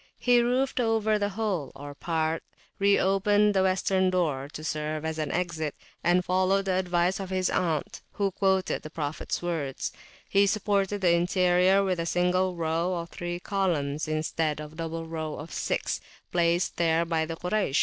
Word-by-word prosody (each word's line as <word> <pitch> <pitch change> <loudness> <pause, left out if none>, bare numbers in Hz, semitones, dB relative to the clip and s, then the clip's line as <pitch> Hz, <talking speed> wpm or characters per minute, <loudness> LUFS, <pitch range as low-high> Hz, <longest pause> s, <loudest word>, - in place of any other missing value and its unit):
He 245 -1 +4
roofed 255 +3 +1
over 220 -2 +2
the 205 0 0
whole, 195 - -2
or 145 +1 -8
a - - -12
part; 160 0 -1 0.4
re 200 0 +4
opened 205 +2 +3
the 190 - +3
western 190 0 +2
door, 150 -7 0
to 155 - -8
serve 155 0 -2
as 160 0 -3
an 150 -2 -2
exit; 165 -4 -2 0.3
and, 180 +1 +3
following 185 +2 +2
the 195 -1 0
advice 180 0 +1
of 190 -2 -5
his 185 -1 0
aunt, 160 -5 -1
who 200 -1 0
quoted 190 -1 +1
the 155 - -8
Prophets 155 +1 -3
words, 155 -6 -2 0.4
he 200 0 +4
supported 200 -1 0
the 175 -2 +4
interior 180 +2 +3
with 185 -3 0
a 165 - -1
single 180 +1 +1
row 165 +2 0
of 170 -1 -4
three 175 0 -4
columns, 165 -7 -1
instead 155 0 -1
of 150 0 -7
the 160 - -16
double 165 0 -4
row 160 -2 -4
of 150 +1 -8
six - - -1 0.3
placed 175 +1 +1
there 165 0 +2
by 165 -1 0
the 165 - -4
Kuraysh. 180 -4 0
175 Hz, 180 wpm, -27 LUFS, 160-195 Hz, 0.4 s, He